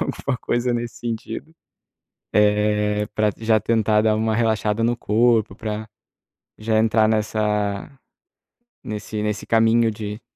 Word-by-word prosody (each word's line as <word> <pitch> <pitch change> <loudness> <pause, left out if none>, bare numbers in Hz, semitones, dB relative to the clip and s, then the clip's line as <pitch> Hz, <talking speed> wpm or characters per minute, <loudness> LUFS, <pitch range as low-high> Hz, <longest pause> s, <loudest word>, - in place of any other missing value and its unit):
alguma - - -2
coisa 120 0 0
nesse 120 -1 -4
sentido. 120 +5 -6 0.8
Eh, 105 0 +2
pra 105 -1 +2
d 110 - -14
já 110 -1 +3
tentar 110 -1 +2
dar 110 -1 +3
uma 110 0 0
relaxada 110 -1 0
no 120 +1 +2
corpo, 115 -2 +2
pra 110 0 -5 0.7
já 110 0 0
entrar 110 0 +3
nessa 105 0 -1 0.9
nesse 105 0 -5
nesse 105 0 -3
caminho 115 0 +3
de 105 0 -6
110 Hz, 125 wpm, -22 LUFS, 105-115 Hz, 0.9 s, já